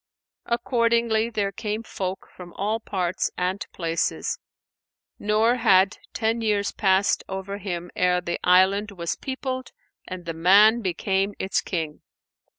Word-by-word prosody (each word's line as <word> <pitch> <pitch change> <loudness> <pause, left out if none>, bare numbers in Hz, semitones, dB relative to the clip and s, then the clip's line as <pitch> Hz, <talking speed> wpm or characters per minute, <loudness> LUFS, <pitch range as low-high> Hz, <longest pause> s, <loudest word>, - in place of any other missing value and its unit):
Accordingly, 235 -2 +1
there 205 -3 -1
came 215 +1 -4
folk 190 -3 -5
from 175 -1 -11
all 215 +3 -1
parts 185 -4 -1
and 185 +2 -1
places, 165 -1 -2 0.8
nor 220 +4 +2
had 195 -3 +4
ten 225 +1 0
years 205 -2 +1
passed 195 0 +2
over 190 +1 -5
him 175 -3 -5
ere 180 0 +2
the 175 -1 -3
island 190 +3 +4
was 170 -4 -3
peopled 260 -1 -4 0.4
and 185 -1 -7
the 165 - -3
man 205 +8 +6
became 195 +1 -1
its 190 - 0
King. 160 -4 -4
200 Hz, 130 wpm, -24 LUFS, 180-220 Hz, 0.8 s, man